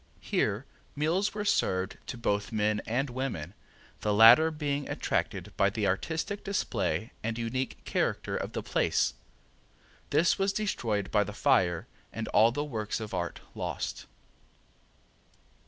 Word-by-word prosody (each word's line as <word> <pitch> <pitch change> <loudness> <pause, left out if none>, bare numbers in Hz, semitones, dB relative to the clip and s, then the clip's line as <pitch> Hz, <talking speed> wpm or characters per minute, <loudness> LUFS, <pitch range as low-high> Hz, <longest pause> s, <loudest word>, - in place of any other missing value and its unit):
Here - - 0 0.3
meals 175 +8 +1
were 210 -1 -2
served 95 - +1
to 125 - -5
both 105 -2 -1
men 105 -1 +1
and 125 +5 0
women, 120 - -3 0.5
the 105 - 0
latter 115 +9 +9
being 145 -2 -2
attracted - - -2
by 100 - +4
the 105 +1 -2
artistic 160 - -1
display 120 - -1
and 115 +1 -2
unique 120 +3 -3
character - - -1
of - - -3
the - - -3
place. - - +1 1.0
This 170 +4 +3
was 195 0 +2
destroyed 115 - -1
by 105 -1 +4
the 105 +1 -7
fire 95 - +2 0.3
and 115 -1 -4
all 115 +2 +5
the 145 +4 -2
works 110 -7 -3
of 110 -2 -6
art 85 -2 -3
lost. - - -4
115 Hz, 140 wpm, -29 LUFS, 105-150 Hz, 1.0 s, latter